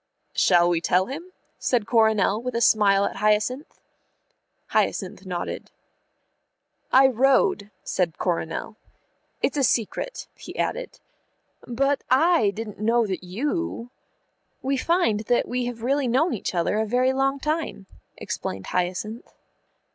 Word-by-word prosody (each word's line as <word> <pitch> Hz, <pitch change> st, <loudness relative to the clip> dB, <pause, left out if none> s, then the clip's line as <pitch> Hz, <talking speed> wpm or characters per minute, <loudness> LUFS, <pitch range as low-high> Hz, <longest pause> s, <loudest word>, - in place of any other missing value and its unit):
"Shall 175 Hz, -2 st, +4 dB
we 170 Hz, -1 st, +1 dB
tell 180 Hz, +2 st, +2 dB
him?" 325 Hz, -, -8 dB, 0.3 s
said 240 Hz, -5 st, +1 dB
Coronel, 220 Hz, -2 st, +3 dB
with 250 Hz, 0 st, -4 dB
a -, -, +1 dB
smile 200 Hz, -3 st, +4 dB
at -, -, -4 dB
Hyacinth. 215 Hz, +7 st, 0 dB, 0.9 s
Hyacinth 190 Hz, 0 st, -1 dB
nodded. 175 Hz, -1 st, -4 dB, 1.2 s
"I 265 Hz, +1 st, +7 dB
rode," 260 Hz, -5 st, +3 dB
said 175 Hz, -4 st, -1 dB
Coronel. 175 Hz, +4 st, -3 dB, 0.7 s
"It's 280 Hz, -, +1 dB
a 280 Hz, -, +2 dB
secret," 240 Hz, -, -1 dB
he -, -, -11 dB
added. -, -, -3 dB, 0.7 s
"But 275 Hz, +3 st, 0 dB
I 270 Hz, -, +4 dB
didn't 210 Hz, 0 st, -7 dB
know 230 Hz, +2 st, +2 dB
that 190 Hz, -3 st, -4 dB
you 245 Hz, -, -3 dB, 0.3 s
" -, -, -47 dB
"We 270 Hz, +1 st, 0 dB
find 300 Hz, -, +1 dB
that 245 Hz, -, +1 dB
we 250 Hz, 0 st, -2 dB
have 235 Hz, -2 st, -6 dB
really 275 Hz, +1 st, +1 dB
known 275 Hz, +9 st, +2 dB
each 200 Hz, -4 st, -4 dB
other 175 Hz, +5 st, +1 dB
a 220 Hz, -, +1 dB
very 250 Hz, +3 st, +2 dB
long 270 Hz, +1 st, 0 dB
time," 305 Hz, -8 st, -3 dB, 0.3 s
explained 95 Hz, 0 st, -5 dB
Hyacinth. 185 Hz, +6 st, -3 dB
230 Hz, 130 wpm, -24 LUFS, 200-270 Hz, 1.2 s, I